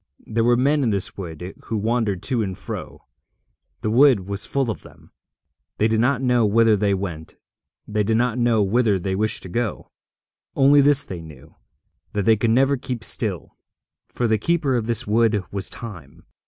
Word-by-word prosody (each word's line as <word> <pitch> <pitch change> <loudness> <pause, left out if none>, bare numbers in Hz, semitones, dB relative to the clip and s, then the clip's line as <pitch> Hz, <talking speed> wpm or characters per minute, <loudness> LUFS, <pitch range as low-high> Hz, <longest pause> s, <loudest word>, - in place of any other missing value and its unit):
There 115 +1 -1
were 120 +1 +3
men 145 +4 +2
in 125 - +1
this 100 -3 -1
wood 90 0 -7
who 110 - -3
wandered 110 -3 -1
to 125 -3 0
and 95 -4 -4
fro. - - -8 0.8
The 110 - -1
wood 130 -2 +5
was 100 +2 -5
full 135 -4 0
of - - -7
them. - - -18 0.7
They 110 - +2
did 110 0 +1
not 125 +2 +1
know 125 -2 +3
whither 110 +1 +4
they 100 -1 +1
went; 85 -5 -6 0.5
they 105 0 -1
did 110 +2 +1
not 125 0 0
know 115 -3 +3
whither 105 0 +2
they 95 +1 -3
wished 105 +3 -1
to 95 - -8
go. 115 +4 -3 0.6
Only 140 +1 +5
this 145 +1 +5
they 90 -3 -7
knew, 80 -2 -14 0.6
that 105 -1 -1
they 110 0 +5
could 110 +2 0
never 135 +4 +3
keep 125 -2 -5
still; 100 -9 -2 0.5
for 120 - -2
the 110 -1 +1
keeper 150 - +1
of 115 -2 -1
this 115 -2 -1
wood 110 -1 +2
was 100 -1 -2
Time. 85 - -10
110 Hz, 185 wpm, -22 LUFS, 100-120 Hz, 0.8 s, wood